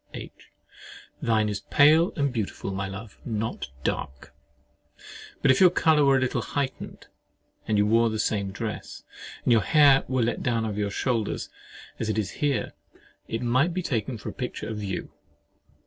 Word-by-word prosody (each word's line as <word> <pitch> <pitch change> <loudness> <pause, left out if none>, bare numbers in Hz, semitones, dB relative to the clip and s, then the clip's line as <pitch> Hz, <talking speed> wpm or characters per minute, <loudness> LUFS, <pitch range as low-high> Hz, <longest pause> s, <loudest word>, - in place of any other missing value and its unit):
H. - - -7 0.9
Thine 110 -2 +2
is 105 -1 -2
pale 155 - +4
and 140 -4 0
beautiful, 105 -3 -3
my 95 0 -3
love, 95 +2 -9
not 110 - -3 0.2
dark! 65 0 -4 1.1
But 135 - +6
if 130 - +2
your 185 - +9
colour 160 -4 +3
were 135 -1 +5
a - - +2
little 125 -1 0
heightened, 135 +4 -4 0.6
and 110 - +1
you 105 - +4
wore 115 +2 +3
the 110 - -3
same 100 -2 0
dress, 105 +2 -6 0.4
and - - +2
your 115 - +5
hair 140 +1 +5
were 130 -2 +1
let 120 - -1
down 115 -3 0
over 105 -1 -3
your 100 -1 0
shoulders, 115 +1 -2 0.5
as 110 - -2
it 110 - -1
is 100 -3 -1
here, 145 -3 0 0.5
it 115 +2 -3
might 130 +8 +2
be 185 - -1
taken 120 -4 -2
for 105 - -7
a - - -8
picture 125 - -5
of 105 -2 -5
you. 95 -2 -4
115 Hz, 175 wpm, -26 LUFS, 105-135 Hz, 1.1 s, your